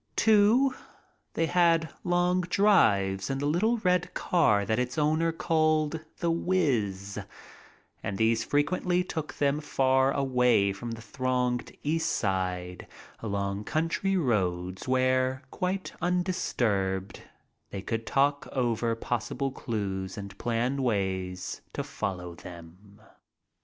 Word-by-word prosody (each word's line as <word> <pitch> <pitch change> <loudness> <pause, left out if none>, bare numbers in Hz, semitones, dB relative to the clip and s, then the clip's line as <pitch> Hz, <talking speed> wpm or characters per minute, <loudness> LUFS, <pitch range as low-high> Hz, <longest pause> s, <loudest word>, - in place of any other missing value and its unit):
Too, 220 +5 +4 0.6
they 165 - +2
had 165 -2 +2
long 175 +1 +2
drives 110 - +3
in 135 - -1
the 140 - -2
little 200 +11 +2
red 180 -4 0
car 110 - +2
that 110 +4 0
its 125 +2 -2
owner 155 +2 +2
called 155 -1 +1 0.2
"The 170 -1 0
Whizz," 120 - 0 0.8
and 100 - -3
these 115 +1 +2
frequently 175 +6 +1
took 160 -4 -5
them 145 +1 +1
far 130 -2 +2
away 125 -7 +2
from 120 +5 -7
the 115 0 -8
thronged 125 -1 -1
East 160 +2 0
Side 90 -2 -2 0.3
along 100 -1 -3
country 165 +5 0
roads 95 - -1
where, 130 +1 +1
quite 185 +1 -2
undisturbed, 115 - -1 0.5
they 95 - -6
could 115 +1 -3
talk 140 +1 +1
over 120 -3 0
possible 120 +4 -2
clues 100 -6 -4
and 100 -1 -7
plan 120 +3 0
ways 95 -6 -2
to - - -2
follow 90 -3 -4
them. 90 +5 -13
130 Hz, 115 wpm, -28 LUFS, 100-165 Hz, 0.8 s, Too